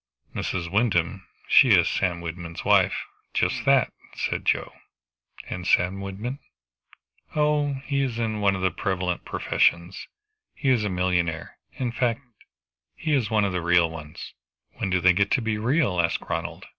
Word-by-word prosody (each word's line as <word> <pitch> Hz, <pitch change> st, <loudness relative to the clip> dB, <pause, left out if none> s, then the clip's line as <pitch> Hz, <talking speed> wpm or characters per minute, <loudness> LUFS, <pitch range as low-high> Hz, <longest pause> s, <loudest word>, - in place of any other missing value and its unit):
"Mrs. 85 Hz, -2 st, -3 dB
Wyndham 95 Hz, -4 st, 0 dB, 0.2 s
she 120 Hz, -6 st, +7 dB
is 85 Hz, 0 st, +3 dB
Sam 90 Hz, -3 st, -1 dB
Wyndham's 85 Hz, 0 st, -7 dB
wife. -, -, +3 dB, 0.3 s
Just -, -, 0 dB
that," -, -, +3 dB, 0.2 s
said -, -, -2 dB
Joe. -, -, 0 dB, 0.7 s
"And 90 Hz, 0 st, -5 dB
Sam 95 Hz, +2 st, +2 dB
Wyndham?" 105 Hz, +8 st, -5 dB, 1.0 s
"Oh 150 Hz, -1 st, +2 dB
he 140 Hz, -1 st, 0 dB
is 125 Hz, -4 st, -2 dB
one 105 Hz, -4 st, +1 dB
of 95 Hz, -, -4 dB
the 95 Hz, -, +2 dB
prevalent 90 Hz, 0 st, -2 dB
profession. 85 Hz, +2 st, +1 dB, 0.6 s
He 135 Hz, -, -1 dB
is 120 Hz, -4 st, +2 dB
a 105 Hz, -, -1 dB
millionaire. 90 Hz, -3 st, -1 dB
In 125 Hz, -2 st, -3 dB
fact 120 Hz, -1 st, 0 dB, 0.7 s
he 155 Hz, -2 st, -2 dB
is 125 Hz, -7 st, +1 dB
one 110 Hz, -2 st, +2 dB
of 100 Hz, -, -1 dB
the 90 Hz, -, -1 dB
real 85 Hz, -1 st, +3 dB
ones." 75 Hz, -2 st, -9 dB, 0.4 s
"When 100 Hz, -, -4 dB
do 90 Hz, 0 st, +2 dB
they 90 Hz, +1 st, +6 dB
get 100 Hz, +2 st, +1 dB
to -, -, +3 dB
be 110 Hz, -2 st, -1 dB
real?" 115 Hz, -, +1 dB
asked 85 Hz, -, -1 dB
Ronald. -, -, -4 dB
95 Hz, 155 wpm, -25 LUFS, 85-115 Hz, 1.0 s, she